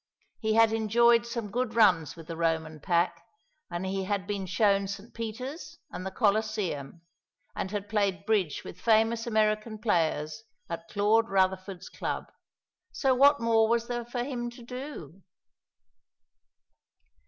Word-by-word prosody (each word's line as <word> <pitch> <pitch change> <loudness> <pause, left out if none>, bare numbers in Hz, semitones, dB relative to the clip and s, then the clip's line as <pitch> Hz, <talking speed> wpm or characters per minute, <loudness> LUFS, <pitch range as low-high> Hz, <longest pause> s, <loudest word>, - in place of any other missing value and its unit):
He 220 -1 0
had 225 -1 +5
enjoyed 235 +2 +4
some 235 -4 -4
good 245 0 -2
runs 180 -10 +4
with 165 - -11
the 165 0 -6
Roman 160 -1 -1
pack, 170 +3 0 0.5
and 175 +1 -4
he 190 0 -2
had 200 -1 -1
been 200 -2 -3
shown 195 +1 +2
St. 200 +3 -7
Peter's 255 +9 -6
and 185 - -6
the 190 - -3
Colosseum, 200 - -1 0.5
and - - -3
had 205 0 -4
played 200 -3 0
bridge 195 -9 0
with 180 - -10
famous 225 +1 +3
American 215 0 +1
players 165 -4 0 0.3
at 170 0 -6
Claude 215 +2 +2
Rutherford's 190 -1 0
club; - - -4 0.6
so 270 -2 +2
what 285 +3 +5
more 225 -1 +3
was 235 0 +2
there 240 -1 -3
for 240 +1 -3
him 245 -2 -3
to 240 0 -13
do? 245 - -8
215 Hz, 140 wpm, -28 LUFS, 185-230 Hz, 0.6 s, had